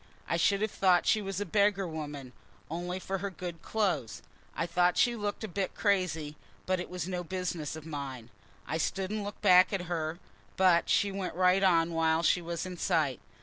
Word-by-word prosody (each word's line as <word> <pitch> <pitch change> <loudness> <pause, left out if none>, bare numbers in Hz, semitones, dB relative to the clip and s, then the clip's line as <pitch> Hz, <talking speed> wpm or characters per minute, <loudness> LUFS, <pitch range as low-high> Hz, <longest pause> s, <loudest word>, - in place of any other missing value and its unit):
I - - 0
should 200 +4 +2
have 215 - -1
thought 185 -2 +3
she 215 - +3
was 195 -1 -4
a 205 - -2
beggar 200 +1 +2
woman, 145 -5 -6 0.4
only 175 +2 -3
for 195 +1 -3
her 200 +2 -3
good 175 -3 -7
clothes. 175 - -1 0.3
I 165 - -1
thought 175 +1 +2
she 240 -1 +3
looked 205 -1 -3
a - - -2
bit 195 0 -3
crazy, 165 -7 0 0.3
but 185 0 0
it 180 - -5
was 180 -2 -4
no 180 -1 -3
business 175 -4 -3
of 160 -1 -9
mine. 135 -6 -6 0.3
I 160 +3 -2
stood 190 +4 -1
and 215 -1 -2
looked 205 +1 -8
back 185 -2 +7
after 195 -3 -1
her, 165 -2 -3 0.4
but 180 -3 +4
she 200 - +3
went 195 -3 -4
right 185 +1 +4
on 170 -3 +3
while 160 0 +2
she 180 - +3
was 170 +1 -4
in 180 -1 -6
sight. 145 -6 +1
180 Hz, 200 wpm, -30 LUFS, 160-195 Hz, 0.4 s, back